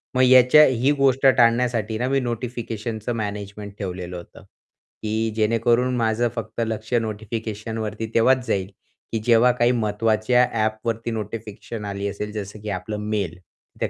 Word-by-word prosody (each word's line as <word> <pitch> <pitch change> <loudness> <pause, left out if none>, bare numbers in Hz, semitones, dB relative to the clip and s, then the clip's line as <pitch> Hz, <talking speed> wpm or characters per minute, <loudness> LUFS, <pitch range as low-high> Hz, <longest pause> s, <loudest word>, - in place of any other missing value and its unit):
मग 130 - +4
याच्या 130 +3 +7
ही 130 +1 +2
गोष्ट 135 -1 +2
टाळण्यासाठी 115 -3 +3
ना 125 +3 -1
मी 135 0 +2
नोटिफिकेशनचं 120 -2 -4
मॅनेजमेंट 105 -1 -5
ठेवलेलं 90 -2 -5
होतं, 85 - -12 0.6
की 110 +1 -1
जेणेकरून 115 +3 +2
माझं 115 0 +1
फक्त 115 +1 -4
लक्ष 110 +1 -5
नोटिफिकेशनवरती 110 -1 -3
तेव्हाच 125 +2 +4
जाईल, 95 -4 0 0.4
की 115 - -1
जेव्हा 120 +1 +5
काही 120 0 +2
महत्त्वाच्या 110 +1 +2 0.2
ॲपवरती 110 +1 -2
नोटिफिकेशन 110 0 -6
आली 100 0 -3
असेल, 105 +1 -5
जसं 105 0 -6
की 105 - -6
आपलं 95 +3 -4
मेल. 100 -7 -2 0.4
त्या - - 0
110 Hz, 140 wpm, -23 LUFS, 105-120 Hz, 0.6 s, याच्या